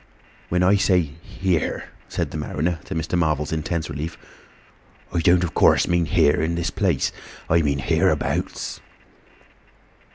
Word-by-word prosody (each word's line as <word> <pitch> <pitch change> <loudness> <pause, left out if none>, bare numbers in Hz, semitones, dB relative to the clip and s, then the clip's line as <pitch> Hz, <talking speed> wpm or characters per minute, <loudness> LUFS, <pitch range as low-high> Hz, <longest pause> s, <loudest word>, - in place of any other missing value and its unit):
"When 90 +1 +2
I 95 +3 +5
say 95 -2 +3 0.2
here," 90 -3 -1 0.3
said - - -2
the - - -4
mariner, 80 +3 -2
to - - -5
Mr. 80 +2 -2
Marvel's 75 -4 0
intense 80 0 -2
relief, 75 +4 -5 1.0
"I - - +1
don't 90 +2 +4
of 85 - -3
course - - +4
mean 85 -1 +2
here 75 +2 +3
in 80 +2 0
this 85 +1 -1
place, 90 -9 +1 0.4
I 85 +1 +3
mean 70 -2 +1
hereabouts." 65 - 0
85 Hz, 140 wpm, -23 LUFS, 75-90 Hz, 1.0 s, I